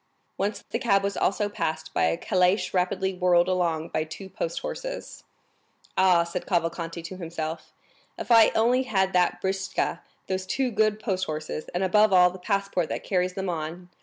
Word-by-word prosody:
Once 205 +2 -2
the 230 - -1
cab 200 -5 +2
was 200 0 -1
also 205 +1 +1
passed 160 -6 -3
by - - +2
a 80 0 +1
calash 185 +2 +1
rapidly 190 +1 0
whirled 180 -1 +3
along 170 -3 0
by 155 - -1
two 165 +5 -9
post - - -4
horses. - - -6 0.7
"Ah," 180 -3 +5
said 170 +1 -5
Cavalcanti 170 -1 -2
to 185 +3 -7
himself, 165 -2 -5 0.5
"if - - -5
I 225 -2 +8
only 240 +3 +3
had 190 -7 0
that 180 -1 +2
britzka, 190 0 -1 0.2
those 185 0 -3
two 255 +5 0
good 215 -1 +2
post 190 -4 -1
horses, 155 0 -4
and 180 - +1
above 210 +2 +4
all 180 -1 +6
the 185 - -10
passport 195 -3 -1
that - - -4
carries 180 -1 0
them 190 0 -3
on!" 170 +1 -4
185 Hz, 175 wpm, -26 LUFS, 170-200 Hz, 0.7 s, I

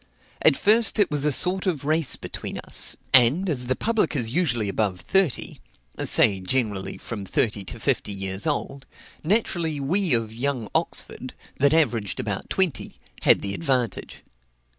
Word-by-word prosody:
At - - +4
first 220 +3 +4
it 205 -7 +2
was 145 -1 0
a 150 - +2
sort 185 +7 +3
of 155 -6 -2
race 155 -1 +1
between - - -7
us; - - +1 0.2
and, 135 +9 +5
as 125 -7 -2
the 130 - 0
public 215 - -1
is 115 -4 -1
usually 120 - 0
above 100 -2 -1
thirty, 190 -8 -1 0.4
(say 95 -2 +4
generally 100 -1 -2
from 105 -4 -7
thirty 105 +1 -1
to 115 - -8
fifty 125 -4 -1
years 95 +3 -3
old,) 140 -2 -4 0.4
naturally 170 -5 0
we 170 +2 +1
of 115 -1 -3
young 125 -2 -3
Oxford, - - -2 0.2
that 140 +1 +4
averaged 120 - 0
about - - -4
twenty, 185 -7 -1 0.2
had - - +4
the 100 -1 -3
advantage. 130 -4 -3
135 Hz, 155 wpm, -23 LUFS, 110-165 Hz, 0.4 s, and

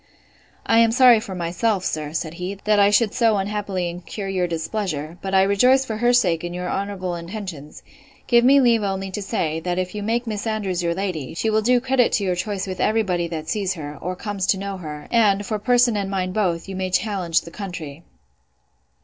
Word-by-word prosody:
I 225 - +4
am 230 -1 +5
sorry 245 -2 +6
for 215 -4 -7
myself, 185 +3 -1
sir, 150 -1 -3
said 160 0 -3
he, 180 +3 -5
that 210 -1 +3
I 200 0 +6
should 210 0 +3
so 230 -4 +3
unhappily 195 -2 -2
incur 180 +4 -6
your 185 -2 0
displeasure; 165 -2 -4
but 195 0 -2
I 190 - +6
rejoice 250 +7 +4
for 220 -4 -4
her 240 +2 +3
sake 180 -10 +2
in 175 0 -5
your 180 0 -4
honourable 195 -2 -3
intentions: 170 -4 -7 0.4
give 235 -1 +4
me 275 +3 +6
leave 235 -4 +4
only 195 -1 -3
to 205 - -4
say, 165 -6 -2
that 175 +2 -3
if 185 0 -2
you 210 - -4
make 230 +4 -1
Miss 215 -1 -4
Andrews 200 -5 -1
your 170 -1 -1
lady, 175 -8 -4
she 220 +5 0
will 215 0 +2
do 245 +3 +3
credit 260 -1 +2
to 205 - +1
your 185 -2 0
choice 190 +2 -3
with 185 -1 -6
every 220 +1 +2
body 175 -4 -1
that 160 -2 -6
sees 195 -1 -1
her, 145 -2 -7
or 180 +2 -3
comes 200 -1 -3
to 195 - +3
know 195 0 -4
her; 150 -4 -8
and, 205 -4 +3
for 215 +1 -2
person 245 +1 +3
and 200 -1 -2
mind 185 -2 -2
both, 180 -5 -1
you 195 - -6
may 185 0 -2
challenge 180 -3 0
the 170 - -11
county. 170 -6 -7
195 Hz, 215 wpm, -22 LUFS, 175-215 Hz, 0.4 s, sorry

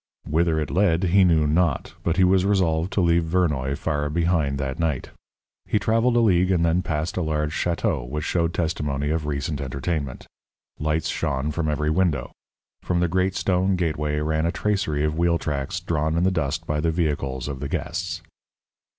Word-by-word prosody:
_ - - -6
Whither 80 0 +2
it 75 -4 -3
led 90 0 +2
he 95 +2 +4
knew 80 -4 +4
not, 75 -1 +1
but 85 +1 -1
he 95 - +5
was 90 0 +4
resolved 90 -3 +1
to 100 - +2
leave 85 -1 +3
Vernoy 75 -6 0
far 75 -2 -1
behind 80 -3 +1
that 70 +2 -3
night. 80 -6 -1 0.6
He - - +1
travelled 115 +3 +2
a - - +5
league 95 -4 +3
and 85 -3 +2
then 85 +2 +2
passed 80 -1 -3
a - - +1
large 75 -2 -1
château 85 - -1
which 75 +2 -3
showed 85 0 0
testimony 75 -4 -1
of 80 -2 -1
recent 70 0 -2
entertainment. 70 0 -3 0.5
Lights 80 +1 0
shone 70 +1 -1
from 80 +1 -1
every 75 +1 0
window; 80 -3 0 0.5
from 90 -1 0
the 90 - +2
great 95 +2 0
stone 95 +1 +1
gateway 75 -4 -1
ran 80 +1 0
a - - +1
tracery 95 -8 -1
of 75 +1 -1
wheel 85 -1 +3
tracks 70 -4 -3
drawn 80 0 -1
in 85 - +2
the 95 - +3
dust 80 -7 -2
by 75 0 -1
the 80 +2 +1
vehicles 70 -6 -1
of 70 -2 -5
the 70 0 -4
guests. 85 +1 -3
80 Hz, 190 wpm, -24 LUFS, 75-90 Hz, 0.6 s, he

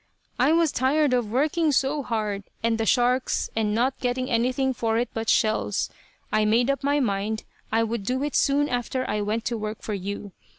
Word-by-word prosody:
I - - +4
was 330 -2 +3
tired 275 +2 +2
of 240 -4 0
working 305 +5 +2
so 280 +2 +1
hard, 215 -5 -2 0.2
and 225 0 +1
the 225 - 0
sharks, 250 0 +2
and 215 -1 0
not 255 +3 +1
getting 255 +1 -1
anything 255 +3 +1
for 225 -2 0
it 240 +1 0
but 225 0 -2
shells. 215 -2 +1 0.4
I 215 - +3
made 235 +5 +3
up 275 - -3
my 285 +1 +2
mind 215 -2 -1 0.3
I 225 +1 +3
would 230 0 -2
do 255 +6 -1
it 295 - -2
soon 285 +1 +3
after 250 +1 -2
I 210 - -1
went 215 +2 -2
to 235 -2 -2
work 215 0 -5
for 215 - -3
you. 200 +1 -5
240 Hz, 200 wpm, -25 LUFS, 220-265 Hz, 0.4 s, I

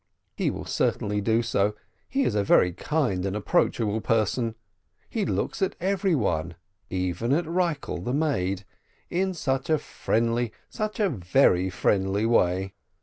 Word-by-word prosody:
He - - 0
will - - -5
certainly 105 0 0
do 115 +3 +2
so, 105 -1 +1 0.3
he 275 +1 +1
is - - +1
a 105 - +1
very 90 -2 +4
kind 115 - 0
and 100 0 -2
approachable 105 +1 +1
person, 115 +1 +1 0.5
he - - -2
looks - - -2
at 190 - +1
every 190 0 +1
one, 85 - -1 0.3
even 95 +6 -1
at 170 +4 +1
Rikel 165 - -1
the 125 - -2
maid, 105 - 0 0.5
in 190 +1 0
such 135 -4 -1
a 155 - +4
friendly, 115 -3 -1 0.2
such 215 0 -3
a 210 - +4
very 95 - +3
friendly 95 +2 +1
way 95 -4 +2
115 Hz, 145 wpm, -26 LUFS, 95-155 Hz, 0.5 s, very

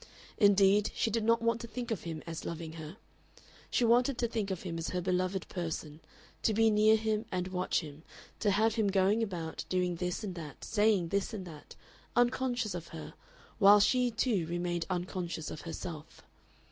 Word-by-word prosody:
Indeed, 200 0 +5
she 225 - 0
did 230 +1 0
not 230 +1 +3
want 230 0 +1
to 235 - -6
think 235 +1 -5
of 215 - -3
him 160 -2 -5
as 165 -1 -6
loving 165 -1 -5
her. 160 +3 -8 0.7
She 245 - +2
wanted 245 +3 +3
to 240 - +1
think 220 -3 -2
of 190 -3 -4
him 170 -3 -4
as 165 - -3
her 180 - -1
beloved 185 +1 -1
person, 160 -4 -5 0.4
to 220 - +1
be 225 0 +4
near 215 +1 +5
him 220 0 -1
and 185 0 -2
watch 180 0 0
him, 150 -1 -10 0.4
to 210 - +2
have 215 +3 +3
him 220 -2 +1
going 195 +3 +3
about, 175 -7 -3
doing 180 -1 0
this 180 +4 -3
and 195 -3 -4
that, 155 -5 -9
saying 210 -5 +2
this 200 +3 -1
and 190 -3 -6
that, 155 -4 -11 0.4
unconscious 245 -3 +1
of 170 -2 -6
her, 160 - -9 0.5
while 205 0 +8
she 250 +4 +3
too 225 -7 0
remained 175 0 -2
unconscious 175 -3 -3
of 155 - -7
herself. 165 -2 -7
190 Hz, 185 wpm, -31 LUFS, 170-220 Hz, 0.7 s, while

